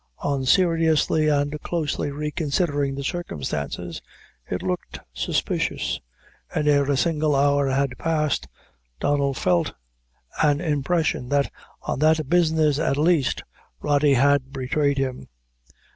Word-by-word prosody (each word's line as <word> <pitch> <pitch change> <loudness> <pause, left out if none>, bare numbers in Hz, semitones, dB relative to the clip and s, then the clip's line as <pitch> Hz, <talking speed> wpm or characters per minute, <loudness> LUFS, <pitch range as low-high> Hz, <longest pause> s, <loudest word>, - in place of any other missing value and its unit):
On 140 -2 0
seriously 160 0 +3
and 145 0 0
closely 155 -3 -2
reconsidering 145 -1 -1
the 140 - -5
circumstances, 85 - -4 0.5
it 90 - -3
looked 90 -1 -3
suspicious, - - -1 0.5
and 150 - 0
ere 145 -1 +3
a 140 - +2
single 155 -1 +1
hour 140 0 +3
had 135 -1 0
passed, 155 -2 0 0.5
Donnel 140 -1 +1
felt 90 -7 +1 0.7
and 145 -2 +3
impression 155 -4 0
that, 140 -1 +1 0.3
on - - -3
that 155 -1 +3
business 160 -3 +3
at 140 -3 +1
least, 155 -3 +2 0.4
Rody 145 -1 +3
had 140 +1 +3
betrayed 140 +2 0
him. 130 - -3
145 Hz, 115 wpm, -24 LUFS, 135-155 Hz, 0.7 s, seriously